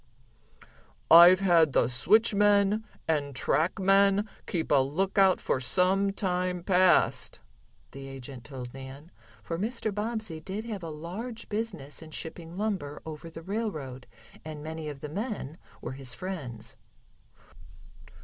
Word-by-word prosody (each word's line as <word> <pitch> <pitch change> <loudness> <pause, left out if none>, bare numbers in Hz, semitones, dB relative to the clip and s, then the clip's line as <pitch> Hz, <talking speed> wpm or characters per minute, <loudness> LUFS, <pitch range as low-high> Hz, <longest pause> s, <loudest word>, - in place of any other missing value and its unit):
"I've 175 +3 +9
had 165 -6 +4
the - - +3
switchmen 205 - +3 0.2
and 145 -4 0
trackmen 195 +8 +3 0.2
keep 165 -3 -2
a 145 - +6
lookout 190 +6 +2
for - - 0
some 190 +8 +2
time 180 -3 -1
past," 185 -2 +3 0.5
the 135 +1 -9
agent 135 -2 -9
told 125 -4 -8
Nan, 135 +5 -10 0.3
for 165 0 -4
Mr. 220 0 -2
Bobbsey 215 -5 -3
did 195 +7 -5 0.2
a 165 - -6
large 195 +10 -7
business 205 -11 -4
in 160 - -10
shipping 165 +2 -6
lumber 190 -9 -2
over 160 +1 -7
the 165 0 -10
railroad, 160 - -4 0.4
and 155 -1 -7
many 160 0 -5
of 140 -2 -9
the 150 - -6
men 195 - -5 0.2
were 120 - -5
his 130 -2 -5
friends. 140 - -6
170 Hz, 125 wpm, -28 LUFS, 145-195 Hz, 0.5 s, I've